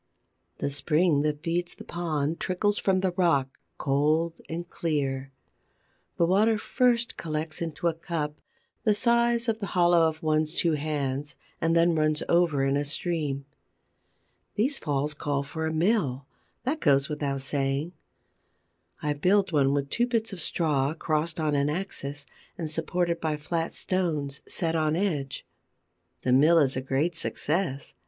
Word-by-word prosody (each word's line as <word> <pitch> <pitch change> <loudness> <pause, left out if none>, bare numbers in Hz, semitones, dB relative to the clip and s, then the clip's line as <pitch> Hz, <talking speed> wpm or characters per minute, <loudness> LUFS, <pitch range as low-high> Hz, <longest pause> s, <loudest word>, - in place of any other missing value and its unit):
The 140 - -2
spring 150 +2 +2
that 150 0 -1
feeds 170 +1 -1
the - - -10
pond 160 -2 -2
trickles 205 +3 0
from 190 -1 +2
the 190 -1 +1
rock, 165 -7 +1 0.2
cold 155 +4 +1
and 170 +2 -4
clear. 135 -6 -2 0.9
The 170 - +4
water 210 +5 +3
first 240 +2 +1
collects 155 0 -3
into 165 0 -4
a 170 - +2
cup, 160 -2 -4 0.4
the 215 -2 +3
size 235 +1 +2
of 225 -1 0
the 200 - -3
hollow 175 -2 +5
of 155 0 -9
one's 155 +1 +1
two 170 - +2
hands, 145 -2 -2 0.3
and 165 0 +2
then 170 +1 +4
runs 155 -1 +1
over 170 -5 +3
in 135 +1 +2
a 145 - 0
stream. 145 -2 -2 1.1
These 260 +7 +1
falls 145 0 -1
call 145 -1 -1
for 160 +3 -4
a - - -1
mill: 160 - +1 0.4
that 280 +6 -1
goes 140 - +3
without 140 -2 -2
saying. 135 +4 -1 1.1
I 150 -1 +1
build 185 +6 +2
one 140 -3 +3
with 140 -1 -1
two 240 +1 +2
bits 225 -3 -1
of 180 - -2
straw, 150 -3 +1
crossed 155 0 -1
on 155 -2 +1
an 140 0 +2
axis, 145 -4 -3 0.3
and 160 -3 -4
supported 170 +2 -1
by 155 -2 -1
flat 165 +2 -3
stones 155 -7 -1
set 165 -2 -1
on 155 -1 +1
edge. 155 -8 -2 0.8
The 125 - +2
mill 155 +6 +6
is 140 -4 +3
a 130 - -1
great 135 +6 0
success. 155 -2 -1
160 Hz, 155 wpm, -27 LUFS, 145-175 Hz, 1.1 s, mill